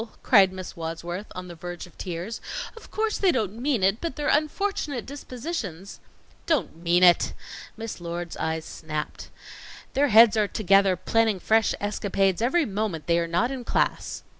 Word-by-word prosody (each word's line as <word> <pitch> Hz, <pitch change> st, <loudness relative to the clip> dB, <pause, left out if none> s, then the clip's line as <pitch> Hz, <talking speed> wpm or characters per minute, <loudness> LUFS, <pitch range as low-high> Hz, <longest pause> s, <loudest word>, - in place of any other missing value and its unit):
cried 195 Hz, -5 st, +6 dB
Miss 185 Hz, -1 st, -8 dB
Wadsworth, 170 Hz, +4 st, -5 dB
on 180 Hz, 0 st, -6 dB
the 175 Hz, -, -8 dB
verge 175 Hz, +2 st, -7 dB
of 180 Hz, -, -18 dB
tears. 180 Hz, +5 st, -5 dB, 0.3 s
"Of 455 Hz, -, -13 dB
course 435 Hz, 0 st, -1 dB
they 385 Hz, -3 st, +4 dB
don't 220 Hz, -, -2 dB
mean 260 Hz, -7 st, +1 dB
it, 195 Hz, +4 st, +2 dB
but 335 Hz, -, -3 dB
their 295 Hz, -1 st, -1 dB
unfortunate 305 Hz, -, 0 dB
dispositions 245 Hz, -, -6 dB, 0.2 s
" -, -, -31 dB
"Don't 315 Hz, -, +1 dB
mean 170 Hz, +2 st, +2 dB
it!" 175 Hz, -1 st, +5 dB, 0.4 s
Miss 225 Hz, -4 st, -6 dB
Lord's 170 Hz, 0 st, -5 dB
eyes 160 Hz, 0 st, -2 dB
snapped. 155 Hz, -2 st, -6 dB, 0.6 s
"Their 285 Hz, +2 st, +3 dB
heads 225 Hz, -2 st, +7 dB
are 210 Hz, -2 st, +2 dB
together 195 Hz, -2 st, +3 dB
planning 220 Hz, +2 st, +1 dB
fresh 220 Hz, +3 st, +2 dB
escapades 195 Hz, -2 st, 0 dB
every 300 Hz, +8 st, +2 dB
moment 195 Hz, -, -3 dB
they 170 Hz, 0 st, +2 dB
are 170 Hz, -, -1 dB
not 175 Hz, +10 st, +1 dB
in 260 Hz, -2 st, -5 dB
class." -, -, -1 dB
200 Hz, 165 wpm, -25 LUFS, 175-245 Hz, 0.6 s, heads